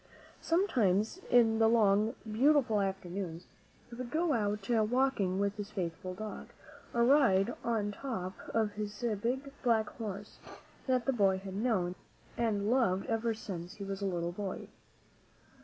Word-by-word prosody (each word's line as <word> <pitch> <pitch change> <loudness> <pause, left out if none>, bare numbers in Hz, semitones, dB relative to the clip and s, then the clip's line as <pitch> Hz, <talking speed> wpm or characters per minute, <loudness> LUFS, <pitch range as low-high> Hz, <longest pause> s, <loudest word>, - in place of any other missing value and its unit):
Sometimes, 245 - +2
in 225 -2 +5
the 225 - +5
long, 215 0 +3 0.2
beautiful 255 -2 +3
afternoons, 190 -3 -4 0.4
he 240 - -14
would 245 0 -6
go 320 +1 +1
out 210 -3 -1
walking 225 -4 +2
with 200 +1 0
his 205 -1 -5
faithful 185 -2 -4
dog, 215 +2 -6 0.4
or 235 0 +3
ride 240 -6 +4
on 215 -3 0
top 200 -6 -4 0.2
of 220 -2 +1
his 210 +2 -5 0.2
big 265 +4 -2
black 225 -3 +2
horse, 205 -2 -6 0.5
that 255 -2 +2
the 270 - +2
boy 195 -5 +3
had 190 0 -7
known 195 -4 0 0.4
and 215 -2 0
loved 195 -7 +2
ever 225 0 0
since 185 -3 -7
he 205 - -7
was 195 0 -5
a 200 - 0
little 175 -2 -2
baby. 195 +1 -5
215 Hz, 145 wpm, -32 LUFS, 195-240 Hz, 0.5 s, in